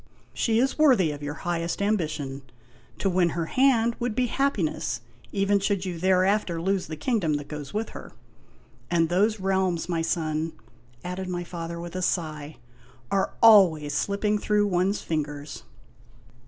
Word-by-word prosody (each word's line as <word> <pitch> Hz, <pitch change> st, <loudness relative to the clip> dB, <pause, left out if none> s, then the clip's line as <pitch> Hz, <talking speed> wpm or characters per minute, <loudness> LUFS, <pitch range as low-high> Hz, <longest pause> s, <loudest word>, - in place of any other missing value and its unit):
She 225 Hz, -2 st, +1 dB
is 265 Hz, +5 st, +1 dB
worthy 245 Hz, -, +5 dB
of 145 Hz, 0 st, -7 dB
your 145 Hz, 0 st, -4 dB
highest 170 Hz, -1 st, -1 dB
ambition. 155 Hz, -9 st, -1 dB, 0.6 s
To -, -, -1 dB
win 180 Hz, -2 st, +3 dB
her 165 Hz, -, 0 dB
hand 235 Hz, +1 st, +3 dB
would 240 Hz, -3 st, -2 dB
be 255 Hz, 0 st, +2 dB
happiness, 225 Hz, -, -1 dB, 0.3 s
even 200 Hz, 0 st, +2 dB
should 195 Hz, -1 st, -1 dB
you 175 Hz, -3 st, -4 dB
thereafter 185 Hz, 0 st, +2 dB
lose 190 Hz, +2 st, -1 dB
the 155 Hz, -, -5 dB
king 230 Hz, -, 0 dB
dom 160 Hz, -5 st, 0 dB
that 145 Hz, 0 st, -4 dB
goes 150 Hz, -2 st, -7 dB
with 220 Hz, +2 st, -2 dB
her. -, -, -10 dB, 0.8 s
And 165 Hz, -2 st, +2 dB
those 210 Hz, +5 st, +2 dB
realms, 190 Hz, -3 st, 0 dB
my 170 Hz, -2 st, -1 dB
son," 160 Hz, -1 st, -1 dB, 0.5 s
added 180 Hz, +1 st, -4 dB
my 175 Hz, -1 st, -3 dB
father, 170 Hz, -1 st, -6 dB
with 175 Hz, +1 st, -7 dB
a 185 Hz, -, -2 dB
sigh, 155 Hz, -4 st, -2 dB, 0.5 s
"are 195 Hz, -1 st, 0 dB
always 175 Hz, -10 st, +6 dB
slipping 205 Hz, +5 st, 0 dB
through 210 Hz, 0 st, +2 dB
one's 190 Hz, +1 st, 0 dB
fingers 150 Hz, -2 st, -4 dB
180 Hz, 155 wpm, -26 LUFS, 160-205 Hz, 0.8 s, always